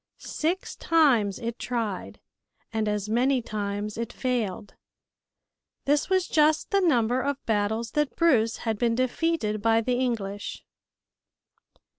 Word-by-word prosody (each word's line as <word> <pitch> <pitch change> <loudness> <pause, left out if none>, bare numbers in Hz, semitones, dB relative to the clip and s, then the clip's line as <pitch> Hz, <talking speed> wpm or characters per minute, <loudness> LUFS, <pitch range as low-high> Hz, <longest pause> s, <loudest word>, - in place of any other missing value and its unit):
Six 340 +5 -3
times 250 - +3
it 235 0 -5
tried 230 -6 -3 0.5
and 220 -1 0
as 210 -1 -1
many 250 +4 +2
times 205 0 -4
it 230 - -3
failed. 230 -7 -2 1.1
This 290 +4 +2
was 375 -2 +2
just 305 0 +2
the 395 0 +3
number 250 -7 +2
of 280 +1 -1
battles 220 +1 0
that 295 -2 0
Bruce 230 -9 +3
had 220 -2 -1
been 235 -1 +2
defeated 255 -4 0
by 225 +1 +3
the 245 +2 0
English. 205 -5 -3
235 Hz, 125 wpm, -26 LUFS, 215-280 Hz, 1.1 s, times